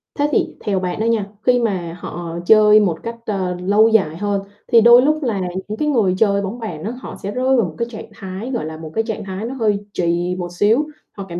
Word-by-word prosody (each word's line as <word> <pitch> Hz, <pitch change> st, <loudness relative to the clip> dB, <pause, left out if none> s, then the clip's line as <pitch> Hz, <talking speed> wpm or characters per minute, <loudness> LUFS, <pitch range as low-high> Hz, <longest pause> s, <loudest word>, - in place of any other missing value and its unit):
Thế 290 Hz, 0 st, +1 dB
thì -, -, +2 dB
theo 195 Hz, -2 st, -1 dB
bạn 180 Hz, 0 st, -3 dB
đó 220 Hz, -, 0 dB
nha, 230 Hz, -3 st, +1 dB, 0.2 s
khi 250 Hz, -1 st, +4 dB
mà 180 Hz, -7 st, -2 dB
họ 170 Hz, -1 st, -6 dB
chơi 215 Hz, +1 st, +7 dB
một 175 Hz, -6 st, 0 dB
cách, 230 Hz, 0 st, -5 dB
ơ, 190 Hz, -4 st, -2 dB
lâu 205 Hz, +4 st, +4 dB
dài 195 Hz, -8 st, +2 dB
hơn 200 Hz, +1 st, -1 dB, 0.3 s
thì 230 Hz, -, +6 dB
đôi 235 Hz, +2 st, +8 dB
lúc 305 Hz, +3 st, +1 dB
là 220 Hz, -7 st, -1 dB, 0.3 s
những 215 Hz, +1 st, -5 dB
cái 300 Hz, -, -1 dB
người 220 Hz, -10 st, +2 dB
chơi 200 Hz, -1 st, +2 dB
bóng 200 Hz, +5 st, -5 dB
bàn 175 Hz, -9 st, -6 dB
á 220 Hz, -, -3 dB
họ -, -, -8 dB
sẽ 200 Hz, -, -3 dB
rơi 260 Hz, +4 st, +1 dB
vào 230 Hz, -, +3 dB
một 160 Hz, -3 st, -7 dB
cái 235 Hz, -, -2 dB
trạng 215 Hz, -, -9 dB
thái, 195 Hz, +5 st, -7 dB
gọi 235 Hz, -10 st, -2 dB
là, 160 Hz, 0 st, -6 dB
một 160 Hz, -1 st, -9 dB
cái 225 Hz, -, +1 dB
trạng 220 Hz, -1 st, -4 dB
thái 190 Hz, +2 st, -5 dB
nó 245 Hz, -, -4 dB
hơi 215 Hz, -5 st, +1 dB, 0.2 s
trì 175 Hz, +1 st, 0 dB
một 175 Hz, -1 st, -5 dB
xíu, 220 Hz, +11 st, +2 dB, 0.2 s
họ 195 Hz, -, -8 dB
cảm 170 Hz, 0 st, -5 dB
205 Hz, 255 wpm, -19 LUFS, 180-230 Hz, 0.3 s, đôi